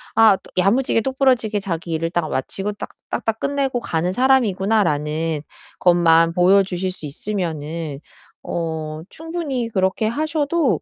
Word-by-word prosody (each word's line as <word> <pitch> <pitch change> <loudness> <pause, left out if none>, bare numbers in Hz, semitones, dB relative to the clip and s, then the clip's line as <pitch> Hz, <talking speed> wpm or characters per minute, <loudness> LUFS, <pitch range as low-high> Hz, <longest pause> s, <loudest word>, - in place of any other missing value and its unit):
'아 220 -3 +6 0.2
야무지게 225 +6 +3
똑 265 +2 -4
부러지게 235 -6 +2
자기 175 -3 -4
일을 165 +1 -1
딱 170 -2 -1
마치고 195 +10 -3
딱 205 - -7 0.2
딱 - - -3
딱 225 0 0
끝내고 275 -3 0
가는 170 -3 -1
사람이구나.'라는 190 - +1 0.4
것만 165 -2 +4
보여주실 185 0 +3
수 180 -4 -10
있으면은 160 -3 -4 0.4
어 160 -2 -4
충분히 315 -7 -4
그렇게 190 +1 +1
하셔도 295 - 0
190 Hz, 300 characters per minute, -21 LUFS, 165-240 Hz, 0.4 s, 아